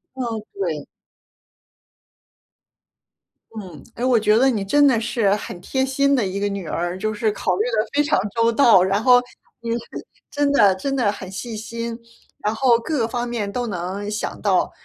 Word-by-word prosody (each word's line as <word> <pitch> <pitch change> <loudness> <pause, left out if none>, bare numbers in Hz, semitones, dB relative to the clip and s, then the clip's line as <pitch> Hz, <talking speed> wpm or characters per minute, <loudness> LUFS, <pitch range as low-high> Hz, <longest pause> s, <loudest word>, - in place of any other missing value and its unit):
嗯， 235 -4 -3
对。 400 0 -3 2.7
嗯， 180 -9 -9
诶， 240 - -5
我 250 -3 +4
觉 215 0 +3
得 265 - +4
你 215 -6 -1
真 290 +9 +3
的 230 -4 +2
是 215 -3 +1
很 195 -3 -7
贴 265 +9 -1
心 275 +1 +2
的 250 - +1
一 190 +1 -3
个 205 - 0
女 200 -4 -5
儿， 175 +3 -2
就 215 +2 -1
是 215 0 0
考 185 -3 -1
虑 205 - 0
得 215 -1 +1
非 295 - +3
常 295 - +1 0.2
周 230 0 +3
到， 230 -6 +5
然 195 +2 +1
后 250 0 +7 0.4
你 230 -1 -4
是 235 - 0 0.5
真 290 -1 0
的 205 -9 +5
真 275 +9 -3
的 235 -6 +2
很 190 -2 -8
细 220 +4 -6
心， 230 +1 -5 0.5
然 210 - 0
后 240 +1 +3
各 235 0 -1
方 240 +1 -3
面 225 -4 -3
都 245 +3 -2
能 195 +1 -4
想 210 +1 -4
到。 195 -3 +1
225 Hz, 195 characters per minute, -21 LUFS, 200-250 Hz, 2.7 s, 后